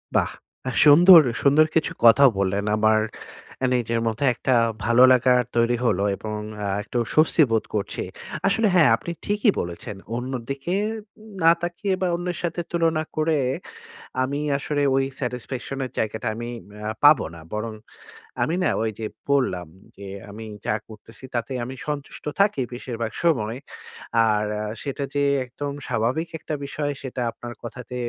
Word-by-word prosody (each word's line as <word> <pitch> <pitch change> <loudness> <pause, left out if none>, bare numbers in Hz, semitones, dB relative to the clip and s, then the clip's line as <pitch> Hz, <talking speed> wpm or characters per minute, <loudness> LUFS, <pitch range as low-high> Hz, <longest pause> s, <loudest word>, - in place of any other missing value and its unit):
বাহ! - - +2 0.4
আ - - -2
সুন্দর, 165 +4 +9 0.2
সুন্দর 145 +3 +5
কিছু 160 - +2
কথাও 125 +4 +8
বললেন। 100 +1 0
আমার 110 0 +4 0.7
এ - - +3
নিজের 115 -1 0
মধ্যে 115 +5 -1
একটা 130 - +1 0.3
ভালো 120 +2 +5
লাগা 125 0 +5 0.2
তৈরি 120 +1 +2
হলো 100 -4 +2
এবং 105 -1 -5 0.3
আ - - -1 0.2
একটু 120 - -5 0.2
স্বস্তি 160 +1 +4
বোধ 110 -1 +2
করছি। 100 - -2 0.4
আসলে 215 +3 +2
হ্যাঁ, 160 -7 +6
আপনি 170 +9 -6
ঠিকই 205 +1 +3
বলেছেন। 90 +5 -5 0.2
অন্যদিকে 135 +6 -3 0.5
উন 220 - -14
না 165 - +8
তাকিয়ে 175 +3 -2
বা, 185 - +2
অন্যের 175 0 -3
সাথে 170 0 -1
তুলনা 165 -2 +1
করে 155 -1 +1 0.8
আমি 140 +3 -2 0.2
আসলে 145 +1 -1
ওই 135 0 +3
স্যাটিসফ্যাকশনের 130 +1 -4
জায়গাটা 110 0 -2
আমি 120 +2 -5 0.2
ম্যা 105 +1 -7 0.2
পাবো 145 -1 +7
না 85 - -11
বরং 110 +1 -3 0.7
আমি 165 - +1
না 165 - +3
ওইযে 110 0 -3 0.2
পড়লাম 125 - +1 0.3
যে, 100 0 -9 0.2
আমি 110 +2 -8 0.2
যা - - +1
করতেছি 110 +3 -13
তাতে 115 +2 -2
আমি 130 +2 -6
সন্তুষ্ট 145 -2 -5
থাকি 200 -9 +3
বেশিরভাগ 115 -2 -4
সময়। 120 -9 +1 0.7
আর 105 -1 +1 0.2
আ - - -2 0.2
সেটা 140 0 -4
যে 145 - +2 0.2
একদম 140 +3 -5 0.2
স্বাভাবিক 125 +8 -1
একটা 155 - -6
বিষয়, 145 +1 -3
সেটা 130 -2 -5
আপনার 120 +1 -9
কথাতে 125 +1 -8
130 Hz, 150 wpm, -24 LUFS, 115-155 Hz, 0.8 s, সুন্দর